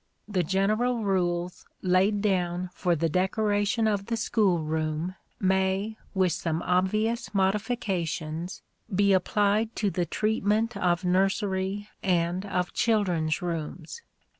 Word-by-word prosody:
The 200 -4 0
general 215 +7 +1
rules 180 -2 -1 0.2
laid 195 +3 +2
down 180 -3 0
for 180 -3 +1
the 165 +1 +1
decoration 205 +5 +1
of 200 -2 -1
the 230 -1 -1
school 210 -5 +2
room 155 +2 -2 0.3
may, 190 +3 +1 0.2
with 185 -2 +3
some 165 0 -2
obvious 215 +5 0
modifications, 185 -5 -1 0.3
be 200 +1 +3
applied 210 +3 +2
to 205 -2 0
the 175 -2 -1
treatment 220 +3 0
of 180 0 +1
nursery 195 +2 0
and 180 +1 0
of 180 -2 -1
children's 180 -7 +1
rooms. 165 - -5
190 Hz, 115 wpm, -27 LUFS, 175-210 Hz, 0.3 s, with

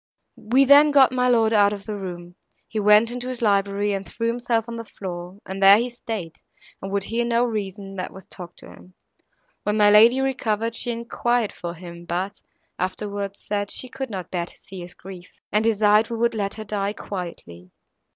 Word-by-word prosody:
"We 245 +4 +2
then 285 +2 +7
got 275 -3 +5
my 250 0 +1
lord 225 -2 +3
out 205 -1 +4
of 200 -1 -8
the 215 - -4
room; 175 -3 -7 0.3
he 220 - -3
went 210 +2 +5
into 245 +1 -4
his 255 -2 -4
library, 200 0 +1
and 195 -1 -3
threw 230 - -5
himself 235 -1 -1
on 235 0 -6
the 230 - -5
floor, 180 -3 -8
and 190 +1 -6
there 195 +1 +9
he 240 +2 -1
staid, 220 -8 -6 0.4
and 195 - -6
would 200 -1 0
hear 230 +3 -1
no 235 0 +2
reason, 200 -4 -4
that 185 - -4
was 190 - -13
talked 175 -1 -11
to - - -13
him. 180 0 -16 0.7
When 210 +1 -1
my 205 -1 +6
lady 230 +5 +7
recovered, 230 -4 -1
she 240 - -2
enquired 235 -1 -1
for 175 -1 -6
him, 170 0 -11
but, 185 +4 -3 0.4
afterwards, 200 +1 -4
said 205 -1 -2
she 255 - -2
could 265 0 -5
not 185 -5 -6
bear 175 -2 -2
to - - -15
see 195 -1 -11
his 175 0 -10
grief, 185 -1 -11 0.2
and 210 +1 +2
desired 215 0 +3
we 230 - -3
would 235 +1 +1
let 200 -2 -2
her 215 - -6
die 205 -1 -2
quietly. 170 - -8
210 Hz, 200 wpm, -23 LUFS, 190-230 Hz, 0.7 s, there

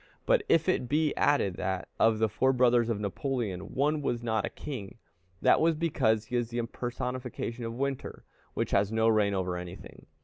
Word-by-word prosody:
But - - +4
if 165 - +4
it 130 -9 +1
be 150 +1 +1
added 100 -11 +2
that, 95 0 -2
of 110 -1 +4
the 110 0 +2
four 130 +6 +2
brothers 120 -2 +3
of 110 -3 -1
Napoleon, 105 -2 -3
one 150 +3 +1
was 120 -4 -2
not 110 -1 0
a - - -4
king, 120 -8 -7 0.5
that - - +5
was 165 0 +3
because 115 -9 +1
he 125 - -5
is 120 -1 -1
the 120 - -5
impersonification 120 0 -4
of 115 - -6
Winter, 135 +1 -3 0.3
which - - -1
has 100 +1 +2
no 110 0 +2
reign 105 -3 +3
over 90 -1 -1
anything. 90 +1 -9
120 Hz, 190 wpm, -29 LUFS, 105-135 Hz, 0.5 s, that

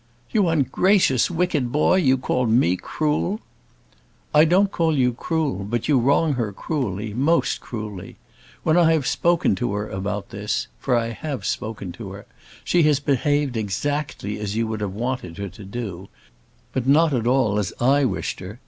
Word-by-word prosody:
"You 205 -5 +3
ungracious, 160 - +3
wicked 165 -8 0
boy! 150 +6 +3
you 135 -7 +3
call 125 -1 0
me 110 -6 +3
cruel!" 155 - -1 0.9
"I 150 +1 +7
don't 190 +4 +3
call 165 -5 +1
you 125 -2 +2
cruel; 145 - -2
but 115 +3 -2
you 145 -4 +4
wrong 140 +5 +3
her 115 -5 -2
cruelly, 105 - -3
most 145 +9 +1
cruelly. 105 -6 -7 0.5
When 160 +1 +3
I 165 -2 +5
have 155 -5 0
spoken 170 0 +2
to 120 0 -1
her 105 +1 -2
about 100 +1 -4
this 60 0 -2
for 125 - +1
I 115 0 -1
have 115 -1 -5
spoken 105 -4 -3
to - - -8
her - - -10 0.4
she 175 - +2
has 150 -3 +3
behaved 145 -1 +1
exactly 110 +1 -2
as 105 -1 -3
you 115 +1 +1
would 110 -1 -4
have 100 -2 -3
wanted 120 -7 -3
her 100 -1 -4
to 100 +3 -12
do; 95 -3 -6 0.6
but 130 -1 -2
not 155 +2 +4
at 120 -3 0
all 120 -5 +2
as 95 -4 -2
I 140 +4 +3
wished 130 - -2
her. 100 +5 -9
125 Hz, 175 wpm, -23 LUFS, 105-150 Hz, 0.9 s, I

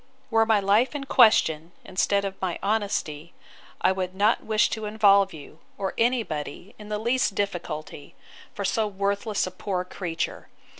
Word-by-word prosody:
'Were 225 0 +3
my 220 -2 +4
life 210 +8 +2
in 285 - -3
question, 170 - +4
instead 200 +1 +1
of 195 - -3
my 185 -2 -2
honesty, 195 -7 -2 0.5
I - - +4
would 185 -1 -3
not 210 +4 +2
wish 220 0 +2
to 220 -1 -3
involve 200 -2 +4
you, 155 0 -12 0.2
or 195 -1 -3
any 240 +1 +2
body, 150 +3 -6
in 210 0 -10
the 210 - -1
least 235 -1 0
difficulty, 165 -7 -4 0.4
for 200 - -5
so 215 +2 +1
worthless 200 +1 -1
a 185 - -6
poor 185 0 -3
creature. 175 -3 -4
200 Hz, 160 wpm, -25 LUFS, 180-215 Hz, 0.5 s, my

